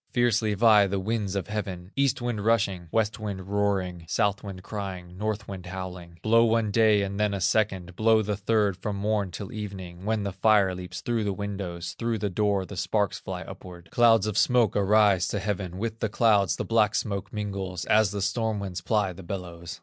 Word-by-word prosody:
Fiercely 115 -3 +2
vie 105 -1 +6
the 100 0 -1
winds 100 -1 -2
of 100 - -1
heaven, 95 -3 -5
East 135 -2 +1
wind 115 -4 -2
rushing, 100 -6 +1
West 110 +1 0
wind 100 -3 -5
roaring, 95 -4 -1
South 100 +1 0
wind 95 -3 -8
crying, 95 -4 -6
North 105 +2 -3
wind 95 -3 -7
howling, 90 -2 -7
Blow 115 +1 +5
one 115 -2 +2
day 110 -2 +4
and 100 +1 -4
then 105 -1 +1
a - - -3
second, 95 -2 0
Blow 110 +1 +4
the 105 0 -1
third 105 -1 +1
from 105 -2 -4
morn 100 -1 0
till 95 +2 -7
even, 95 -4 -7
When 110 0 0
the 100 - -2
fire 100 -1 +3
leaps 90 0 -7
through 115 -2 -1
the 100 -1 -1
windows, 95 -4 -5
Through 115 -1 0
the 105 -1 -2
door 100 0 +1
the 100 - -9
sparks 100 +3 0
fly - - -6
upward, 85 -2 -11
Clouds 115 -3 +5
of 105 -2 0
smoke 120 -4 +3
arise 100 -2 +4
to - - -2
heaven; 95 -3 -3
With 115 +2 -3
the 110 - -1
clouds 100 -6 +3
the - - -4
black 110 -2 +2
smoke 100 -2 -2
mingles, 95 -4 -4
As 110 -1 +4
the 100 0 -3
storm 110 +1 0
winds 95 -2 -5
ply 105 -4 0
the 90 - -11
bellows. 85 -2 -7
100 Hz, 200 wpm, -26 LUFS, 95-110 Hz, -, vie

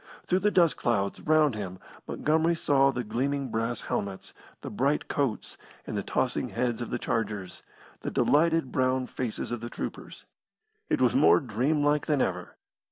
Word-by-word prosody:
Through 185 - +2
the 210 - +2
dust 175 -5 +3
clouds 100 -5 -1
round 155 -3 +3
him 95 -4 -5 0.3
Montgomery 160 +2 +1
saw 140 -4 +3
the 125 -2 -2
gleaming 135 +5 -2
brass 115 +1 -1
helmets, 100 -2 -4 0.3
the - - -6
bright 140 +3 0
coats, 135 -7 -2 0.3
and - - -5
the - - 0
tossing - - -1
heads 120 -2 -1
of 120 - -4
the - - -1
chargers, 105 -6 -3 0.4
the - - -4
delighted 160 -2 +2
brown 130 0 +1
faces 125 -3 -4
of 120 -2 -3
the 120 - -5
troopers. - - -7 0.6
It - - +1
was 125 -2 +4
more 85 +2 +6
dream 130 +6 0
like 150 0 +2
than 150 -2 +2
ever. - - -2
130 Hz, 165 wpm, -28 LUFS, 115-150 Hz, 0.6 s, more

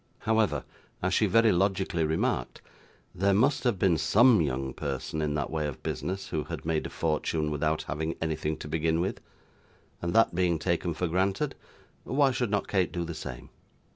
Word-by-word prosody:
However, 110 -1 +1 0.4
as 95 +1 +1
she 105 - +3
very 115 +3 +5
logically 95 -2 +1
remarked, 80 +1 -1 0.5
there 100 +2 +2
must 130 +7 +3
have 120 -5 +2
been 90 -4 +2
SOME 120 - +5
young 65 -2 -2
person 80 - -3
in 75 -1 -1
that 75 - -2
way 80 -2 -1
of 70 - -7
business 95 +2 -3
who 75 -2 -2
had - - -6
made 80 -1 0
a - - -10
fortune 75 -1 -1
without 75 +1 0
having 80 +2 -3
anything 80 -1 -2
to - - -8
begin 80 +1 0
with, 90 +3 -2 0.8
and 85 - -1
that 115 -5 +5
being 85 -1 +2
taken 85 0 -1
for 90 - -1
granted, 95 - 0 0.5
why 135 0 +2
should 125 -2 -1
not 100 -1 0
Kate 95 -4 +1
do 85 - -2
the 85 - -5
same? 60 -5 -8
85 Hz, 180 wpm, -28 LUFS, 80-100 Hz, 0.8 s, very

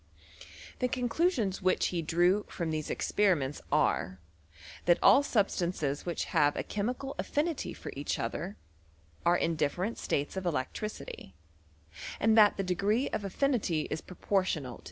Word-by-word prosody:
The 250 - +2
conclusions 245 - 0
which 185 0 +2
he 175 -2 -1
drew 175 +5 +2
from 170 -3 -3
these 155 -1 -3
expe 205 -3 +2
riments 140 -1 -4
are, 95 +3 +1 0.7
that 175 -1 +5
all 275 - +8
substances 180 - 0
which 170 - -1
have 145 0 +4
a - - -2
che 210 - -4
mical 255 +5 -3
affinity 305 +1 -1
for - - -8
each 140 +1 -2
other, 175 - -4 0.7
are 175 +1 +5
in 165 -1 0
different 175 +8 -1
states 145 +5 -1
of 190 -1 -3
electricity, 165 - -4 0.8
and 220 +1 +4
that 210 -2 +6
the 195 - 0
degree 200 +8 +1
of 210 - -3
affinity 200 - 0
is - - -2
pro 180 - -12
portional 165 - -1
to. - - -23
185 Hz, 155 wpm, -30 LUFS, 160-215 Hz, 0.8 s, all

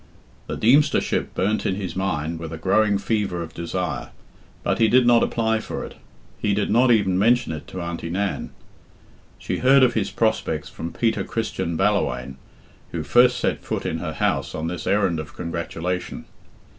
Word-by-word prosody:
The - - -4
Deemstership 135 +7 +2
burnt 105 +4 0
in 95 - 0
his 95 -3 -5
mind 85 -4 -2
with 80 -1 -6
a 80 - -5
growing 100 +4 +2
fever 100 -4 -1
of 80 - -10
desire, 90 +2 -3 0.5
but - - 0
he 115 - +5
did 125 +3 +4
not 120 -1 +5
apply 110 -1 +1
for - - -5
it. - - -10 0.5
He 100 -1 +1
did 105 0 0
not 125 +3 +4
even 100 -5 +3
mention 120 -1 +3
it 80 -2 -6
to 90 - -6
Auntie 85 -1 -5
Nan. 95 +3 -2 0.9
She - - -3
heard 135 +1 +6
of 125 -2 +4
his 110 -4 0
prospects 80 -9 -1
from 85 - -6
Peter 115 -1 0
Christian 100 -7 -3
Balla 105 +2 +3
whaine, 60 +1 -5 0.5
who - - -3
first 125 0 +4
set - - -1
foot - - -3
in 80 - -2
her 80 -2 -4
house 70 -1 -1
on 80 - -3
this 85 0 -4
errand 95 -5 +2
of 80 - -8
congratulation. 85 +1 -4
95 Hz, 180 wpm, -23 LUFS, 85-110 Hz, 0.9 s, heard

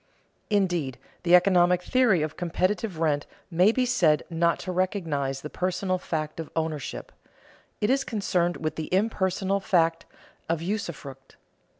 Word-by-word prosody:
Indeed, 175 - 0 0.2
the 175 0 +5
economic 180 -1 +4
theory 230 -11 +3
of 155 0 -4
competitive 185 +3 -1
rent 150 -3 0 0.2
may 180 +5 +5
be 255 +2 +1
said 170 -11 +3
not 170 0 +2
to 185 - -4
recognize 160 -8 -1
the 150 - -6
personal 185 0 -1
fact 155 -2 -4
of 160 - -5
ownership; 160 -3 -3 0.7
it 210 +3 +2
is 270 +1 +2
concerned 180 -7 0
with 155 -1 -3
the 155 - -5
impersonal 195 -1 +1
fact 165 -4 +1 0.4
of 165 -1 +1
usufruct. 165 -8 -5
175 Hz, 135 wpm, -26 LUFS, 160-195 Hz, 0.7 s, the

